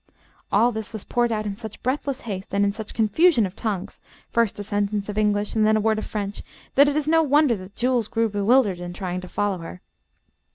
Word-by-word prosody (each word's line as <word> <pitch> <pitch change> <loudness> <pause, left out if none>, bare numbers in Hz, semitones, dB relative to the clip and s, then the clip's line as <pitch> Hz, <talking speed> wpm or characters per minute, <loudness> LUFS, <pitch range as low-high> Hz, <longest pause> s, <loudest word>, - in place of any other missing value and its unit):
All 230 +4 +4
this 220 -1 -6
was 220 - -6
poured 240 -1 0
out 215 -1 -1
in 200 -1 -3
such 220 -1 -9
breathless 270 +1 -1
haste, 200 -3 -5
and 200 0 +3
in 200 - +2
such 215 0 -7
a - - -9
confusion 230 - +4
of 185 0 -7
tongues, 205 -4 -4 0.3
first 230 -3 +1
a 205 - -4
sentence 205 0 -1
of 210 - -5
English 210 -1 +1
and 220 - +2
then 215 0 +4
a - - +2
word 215 0 +1
of - - -6
French, 205 -1 -4 0.3
that 280 +1 +6
it 290 - -2
is 305 -1 0
no 325 +1 +5
wonder 290 -4 +3
that 185 +1 -11
Jules 245 -3 +1
grew 230 0 +1
bewildered 205 -1 +2
in 175 0 -6
trying 180 -1 -4
to 185 - -9
follow 200 0 -1
her. 165 +2 -8
215 Hz, 235 wpm, -24 LUFS, 200-235 Hz, 0.3 s, that